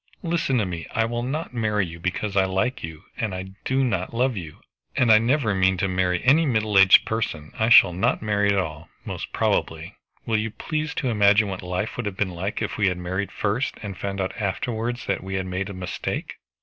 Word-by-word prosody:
"Listen 165 Hz, -6 st, 0 dB
to 110 Hz, -, +1 dB
me. 85 Hz, -3 st, -5 dB
I 115 Hz, -, +3 dB
will 120 Hz, +1 st, -2 dB
not 140 Hz, +4 st, -3 dB
marry 105 Hz, -4 st, 0 dB
you 85 Hz, 0 st, -9 dB
because 95 Hz, +3 st, -2 dB
I 95 Hz, -1 st, +4 dB
like 95 Hz, +7 st, -1 dB
you 80 Hz, -1 st, -7 dB
and 105 Hz, -5 st, -2 dB
I 95 Hz, +1 st, -6 dB
do 135 Hz, +1 st, +1 dB
not 95 Hz, -4 st, -1 dB
love 125 Hz, +1 st, +1 dB
you, 85 Hz, -6 st, -7 dB, 0.4 s
and 120 Hz, -3 st, +4 dB
I 110 Hz, -, +8 dB
never 120 Hz, -1 st, +1 dB
mean 95 Hz, -1 st, +2 dB
to 95 Hz, -, 0 dB
marry 90 Hz, -1 st, 0 dB
any 145 Hz, +6 st, +5 dB
middle 110 Hz, -7 st, 0 dB
aged 95 Hz, -1 st, +7 dB
person. 85 Hz, -9 st, -3 dB
I 110 Hz, +1 st, +2 dB
shall 95 Hz, -6 st, +8 dB
not 90 Hz, -, +1 dB
marry 105 Hz, -1 st, +1 dB
at 100 Hz, -, +1 dB
all, 80 Hz, -4 st, -3 dB, 0.2 s
most -, -, -5 dB
probably. 80 Hz, +4 st, -1 dB, 0.3 s
Will 110 Hz, -1 st, +1 dB
you 110 Hz, +1 st, -2 dB
please 155 Hz, +7 st, -4 dB
to 130 Hz, -, -1 dB
imagine 105 Hz, -1 st, +4 dB
what 95 Hz, -1 st, -5 dB
life 90 Hz, +4 st, -3 dB
would 120 Hz, -3 st, -2 dB
have 95 Hz, -2 st, -5 dB
been 100 Hz, -3 st, 0 dB
like 95 Hz, +4 st, -3 dB
if -, -, -4 dB
we 100 Hz, -, +3 dB
had 90 Hz, -1 st, 0 dB
married 95 Hz, +3 st, -3 dB
first, 110 Hz, +7 st, -1 dB
and 100 Hz, -2 st, -5 dB
found 100 Hz, +1 st, -4 dB
out 95 Hz, -1 st, -2 dB
afterwards 115 Hz, +4 st, -2 dB
that -, -, -2 dB
we 95 Hz, 0 st, -4 dB
had 95 Hz, -1 st, -1 dB
made 95 Hz, +2 st, -3 dB
a -, -, -6 dB
mistake." 90 Hz, -1 st, -4 dB
100 Hz, 225 wpm, -24 LUFS, 95-115 Hz, 0.4 s, I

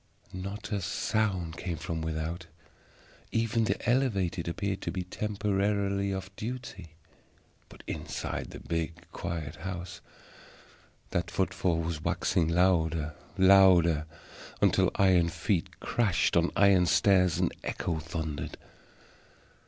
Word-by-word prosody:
Not 100 Hz, +3 st, -6 dB
a 100 Hz, -2 st, 0 dB
sound 95 Hz, -2 st, -1 dB
came 85 Hz, -3 st, -3 dB
from 80 Hz, +1 st, -4 dB
without, 80 Hz, +2 st, -3 dB, 0.8 s
even 115 Hz, 0 st, +1 dB
the -, -, -2 dB
Elevated 100 Hz, -10 st, +1 dB
appeared 95 Hz, +3 st, -2 dB
to -, -, -3 dB
be 90 Hz, 0 st, -3 dB
temporarily 100 Hz, 0 st, 0 dB
off 95 Hz, +1 st, -5 dB
duty; 115 Hz, -9 st, -7 dB, 0.7 s
but -, -, -14 dB
inside -, -, -4 dB
the -, -, -9 dB
big 85 Hz, 0 st, -2 dB, 0.2 s
quiet 80 Hz, -5 st, -5 dB
house 90 Hz, +1 st, -6 dB, 1.1 s
that -, -, -1 dB
footfall 85 Hz, -3 st, 0 dB
was 80 Hz, -2 st, -3 dB
waxing 80 Hz, 0 st, +1 dB
louder, 80 Hz, -3 st, +2 dB, 0.2 s
louder, 95 Hz, -5 st, +6 dB, 0.5 s
until -, -, +4 dB
iron 90 Hz, -3 st, +4 dB
feet 85 Hz, +2 st, -2 dB
crashed 110 Hz, -7 st, +1 dB
on -, -, +4 dB
iron 95 Hz, -3 st, +5 dB
stairs 90 Hz, -4 st, +4 dB
and -, -, +1 dB
echo 80 Hz, -, -2 dB
thundered. 80 Hz, -1 st, -5 dB
90 Hz, 115 wpm, -29 LUFS, 85-100 Hz, 1.1 s, louder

